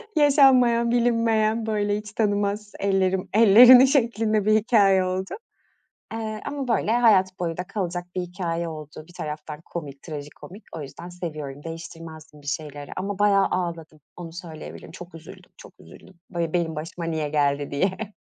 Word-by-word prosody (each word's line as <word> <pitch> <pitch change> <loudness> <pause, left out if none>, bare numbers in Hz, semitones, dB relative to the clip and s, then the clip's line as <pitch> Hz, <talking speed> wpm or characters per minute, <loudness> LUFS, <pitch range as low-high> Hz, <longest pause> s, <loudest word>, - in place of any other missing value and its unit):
Yaşanmayan 260 -5 +4
bilinmeyen 230 -2 +1
böyle 205 -1 0
hiç 210 -1 -8
tanımaz 205 -1 -1
ellerim 190 -1 0
ellerini 240 +5 +8
şeklinde 225 -6 +1
bir 215 - +4
hikâye 205 -4 +4
oldu. 185 +1 -3 0.8
Eee, 215 -1 -5
ama 285 -2 -4
böyle 225 -2 +1
hayat 200 -6 +3
boyu 170 -2 -3
da 180 - -3
kalacak 180 -3 -4
bir 185 - -1
hikâye 170 -2 -4
oldu 155 -1 -9
bir 175 - -17
taraftan 150 -1 -7
komik 140 -5 -8
trajikomik 155 +6 -10
o 155 - -6
yüzden 170 +5 -9
seviyorum 155 -5 -7
değiştirmezdim 165 -2 -10
bir 145 - -15
şeyleri. 145 0 -5
Ama 195 +1 -4
bayağı 200 -1 +4
ağladım 165 -3 -4 0.2
onu 170 -2 -8
söyleyebilirim 165 -4 -10
çok 175 0 -11
üzüldüm, 165 -1 -13
çok - - -14
üzüldüm 80 - -16 0.2
böyle 170 -3 -3
benim 170 -2 -1
başıma 165 +2 -6
niye 160 -3 -2
geldi 145 -1 0
diye. 190 +7 -2
185 Hz, 150 wpm, -24 LUFS, 160-215 Hz, 0.8 s, ellerini